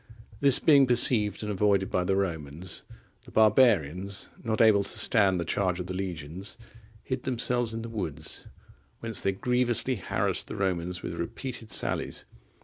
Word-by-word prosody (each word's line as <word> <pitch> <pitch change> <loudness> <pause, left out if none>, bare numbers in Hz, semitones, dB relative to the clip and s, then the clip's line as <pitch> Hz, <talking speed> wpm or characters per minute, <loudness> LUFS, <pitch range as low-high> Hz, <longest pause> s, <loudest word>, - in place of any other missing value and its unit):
This 140 -2 +6
being 140 -4 +5
perceived 115 -4 +4
and 105 - -3
avoided 100 -1 +1
by 90 - 0
the 95 +2 0
Romans, 85 -2 -3 0.4
the - - -14
barbarians, 100 - +2
not 110 -2 -2
able 110 -3 +5
to 100 - -6
stand 95 -5 +3
the 85 - -3
charge 90 +1 -1
of 90 - -4
the 90 - -6
legions, 90 0 -6 0.5
hid 130 -1 -4
themselves 120 -2 0
in 115 - -5
the - - -6
woods, 100 -10 -4 0.5
whence 115 -4 +1
they 95 - +1
grievously 125 +4 +1
harassed 85 - -2
the - - -6
Romans 90 -2 -2
with - - -5
repeated 120 -4 -6
sallies. - - 0
100 Hz, 155 wpm, -27 LUFS, 90-115 Hz, 0.5 s, This